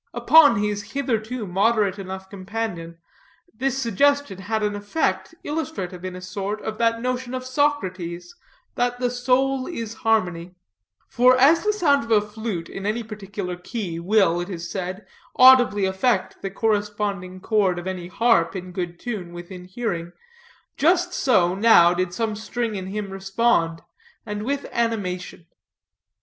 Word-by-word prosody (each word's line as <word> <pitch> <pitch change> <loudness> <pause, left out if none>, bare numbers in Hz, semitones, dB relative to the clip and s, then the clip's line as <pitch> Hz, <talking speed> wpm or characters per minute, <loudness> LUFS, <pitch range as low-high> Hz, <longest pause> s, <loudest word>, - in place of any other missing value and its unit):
Upon 305 -6 +6
his 205 -1 -2
hitherto 245 -4 -2
moderate 205 +1 +1
enough 190 0 -7
companion, 190 -4 -5 0.6
this 265 +3 -1
suggestion 270 -2 +1
had 215 +3 -2
an 205 0 0
effect 205 +1 -2
illustrative 295 - -4
in 185 -1 -5
a 185 - -8
sort 200 +3 -4
of 215 0 -5
that 230 0 +2
notion 250 +1 -3
of 255 0 -5
Socrates, 185 - -1 0.4
that 245 0 -1
the 250 -1 0
soul 255 +2 +1
is 230 -10 -5
a - - -17
harmony; 180 -6 0 0.5
for 255 +2 +4
as 300 +6 +5
the 425 - +2
sound 295 - +2
of 230 - -10
a 215 - +6
flute, 210 -4 -5
in 195 +1 -6
any 225 +3 -1
particular 200 -4 -6
key, 180 -2 -5
will, 175 -2 +2
it 175 - -6
is 170 -3 -6
said, 185 +1 -5 0.3
audibly 250 -6 +6
affect 190 +2 0
the 195 - -3
corresponding 205 -3 -2
chord 195 -3 +1
of 175 - -6
any 185 -2 -4
harp 195 -4 +2
in 185 -1 -6
good 175 -1 -5
tune, 200 -8 -5
within 180 +1 -9
hearing, 180 -4 -4 0.6
just 355 +3 +2
so 185 -10 +3
now 190 -4 +6
did 180 0 -1
some 220 +2 -2
string 225 +1 -3
in 190 -2 -5
him 200 0 -4
respond, 195 -4 0 0.4
and 210 0 -4
with 280 +2 -2
animation. 185 -7 -2
210 Hz, 150 wpm, -23 LUFS, 185-240 Hz, 0.6 s, Upon